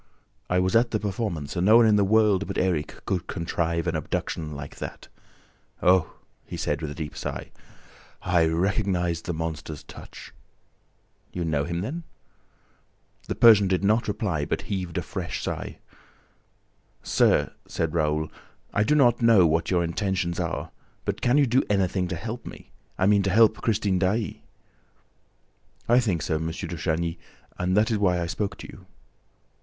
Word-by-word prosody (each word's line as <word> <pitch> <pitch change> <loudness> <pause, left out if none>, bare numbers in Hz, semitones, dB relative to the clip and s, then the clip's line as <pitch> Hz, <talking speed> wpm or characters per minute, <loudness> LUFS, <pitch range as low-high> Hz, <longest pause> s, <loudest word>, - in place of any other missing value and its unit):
"I 90 - +2
was 90 +2 +1
at 115 +1 +4
the 110 - -1
performance 100 -8 -3
and 90 - 0
no 110 +2 +8
one 120 - +6
in 110 -1 +5
the 100 - +4
world 105 -1 +3
but - - -4
Erik 85 -5 -1
could 90 -2 -2
contrive 85 -1 -2
an 85 -1 -1
abduction 80 +1 -3
like 70 0 -8
that!... - - -8 0.7
Oh," 90 -2 +3 0.3
he - - -7
said, 75 +1 -2
with 80 - -3
a 75 - -7
deep 75 -3 -6
sigh, - - -5 0.7
"I 85 -2 +3
recognized 90 0 0
the 90 - -1
monster's 80 -2 -5
touch! - - -12 0.5
..." - - -41
"You 90 -1 -2
know 75 -3 0
him 85 0 -3
then?" 150 - -4 1.3
The - - -2
Persian 105 -4 +7
did 95 0 0
not 110 +4 +2
reply, 100 -8 -1
but - - -2
heaved 90 -4 -4
a - - -1
fresh - - -5
sigh. - - -4 1.3
"Sir," - - +2
said 80 -1 -2
Raoul, 75 -1 0 0.4
"I - - +2
do 150 - +2
not 120 -5 +4
know 115 -6 +6
what 80 +1 +1
your 90 -2 +2
intentions 90 0 -1
are, - - -3 0.3
but - - -2
can 120 +4 +3
you 145 - +5
do 130 +2 +3
anything 95 -2 +1
to - - -3
help 115 +2 -6
me? - - -11 0.3
I 95 - +2
mean, 100 0 +4
to 100 - 0
help 110 +2 +4
Christine 105 -4 +1
Daae?" 100 +1 -1 1.5
"I 120 +2 +5
think 95 - 0
so, 80 - 0
M. 80 +1 -3
de 80 +2 -5
Chagny, 80 +2 -2 0.4
and 90 +2 +1
that 110 +3 +3
is 110 - +1
why 90 -3 +2
I 85 - -1
spoke 100 +4 -3
to - - -9
you." - - -14
90 Hz, 170 wpm, -25 LUFS, 85-105 Hz, 1.5 s, no